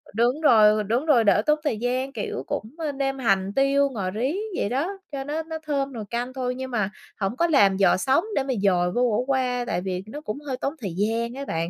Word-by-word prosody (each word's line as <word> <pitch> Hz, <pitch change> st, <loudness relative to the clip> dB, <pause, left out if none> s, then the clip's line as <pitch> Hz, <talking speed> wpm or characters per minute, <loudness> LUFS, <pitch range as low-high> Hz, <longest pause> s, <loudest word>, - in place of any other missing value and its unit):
Đúng 245 Hz, +7 st, +2 dB
rồi, 215 Hz, -6 st, +5 dB
đúng 235 Hz, +8 st, 0 dB
rồi, 270 Hz, -8 st, +5 dB
đỡ 205 Hz, 0 st, +4 dB
tốn 300 Hz, 0 st, +3 dB
thời 290 Hz, -8 st, 0 dB
gian, 255 Hz, +4 st, -2 dB
kiểu, -, -, -4 dB
cũng, 225 Hz, +7 st, -4 dB
ơ, 315 Hz, -3 st, -2 dB
nêm 270 Hz, -1 st, -2 dB
hành 195 Hz, -5 st, +1 dB
tiêu, 275 Hz, +1 st, +3 dB
ngò 200 Hz, -8 st, -3 dB
rí 250 Hz, -, -1 dB, 0.2 s
vậy -, -, 0 dB
đó, 270 Hz, +7 st, 0 dB, 0.2 s
cho 275 Hz, -2 st, -4 dB
nó 300 Hz, +3 st, -3 dB
nó 320 Hz, 0 st, -5 dB
thơm 280 Hz, -3 st, -2 dB
nồi 225 Hz, -3 st, -5 dB
canh 245 Hz, +2 st, -3 dB
thôi 250 Hz, -1 st, -2 dB
nhưng 260 Hz, 0 st, -6 dB
mà 210 Hz, -5 st, 0 dB, 0.3 s
hổng 200 Hz, +4 st, -2 dB
có 340 Hz, -, +3 dB
làm 200 Hz, -, +4 dB
giò 195 Hz, -, +4 dB
sống 265 Hz, -, +2 dB
để 275 Hz, -, +2 dB
mà 265 Hz, -1 st, -1 dB
dồi 180 Hz, -3 st, +3 dB
vô 240 Hz, -, 0 dB
khổ 215 Hz, +4 st, +1 dB
qua, 255 Hz, -2 st, 0 dB
tại 180 Hz, -, -1 dB
vì 185 Hz, 0 st, -3 dB
nó 290 Hz, +7 st, -7 dB
cũng 215 Hz, -2 st, -5 dB
hơi 260 Hz, -2 st, -2 dB
tốn 275 Hz, +2 st, -2 dB
thời 195 Hz, -6 st, -4 dB
gian 230 Hz, +4 st, -1 dB
ấy 280 Hz, -, -5 dB
bạn. 165 Hz, -7 st, -2 dB
250 Hz, 245 wpm, -24 LUFS, 210-275 Hz, 0.3 s, rồi